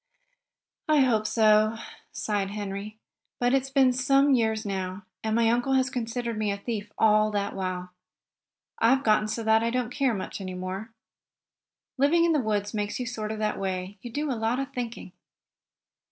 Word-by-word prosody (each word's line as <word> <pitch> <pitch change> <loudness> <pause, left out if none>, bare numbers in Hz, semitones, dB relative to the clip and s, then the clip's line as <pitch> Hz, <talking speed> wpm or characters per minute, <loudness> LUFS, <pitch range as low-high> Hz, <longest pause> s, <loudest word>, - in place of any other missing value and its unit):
"I 305 -2 +5
hope 225 -5 +2
so," 215 0 +4 0.3
sighed 205 -2 -2
Henry. 205 +1 -5 0.4
"But 245 +1 +2
it's 270 0 +1
been 265 -2 +4
some 275 +2 +3
years 220 -3 +1
now, 190 0 -4 0.2
and 220 0 0
my 230 0 +3
uncle 245 +4 +1
has 260 0 +2
considered 235 -2 -3
me 210 -1 0
a 200 - -3
thief 210 0 -5
all 215 -1 +4
that 200 -1 -1
while. 185 -1 -4 0.9
I've 265 +4 +4
gotten 215 -1 +3
so 220 +1 -4
I 220 +1 +4
don't 250 +1 0
much - - -10
care 260 -8 +1 0.2
any 185 -2 -5
more. 190 +5 -5 1.1
Living 330 +5 +4
in 335 - +3
the 300 - +3
woods 205 -4 -1
makes 210 +1 -2
you 250 - -2
sort 220 -3 -4
of 220 - -4
that 215 0 -1
way. 190 +1 -4
You 240 - -8
do 290 +3 -2
a - - +1
lot 225 +1 0
of 275 - -4
thinking. 235 -6 -5
220 Hz, 175 wpm, -27 LUFS, 205-250 Hz, 1.1 s, I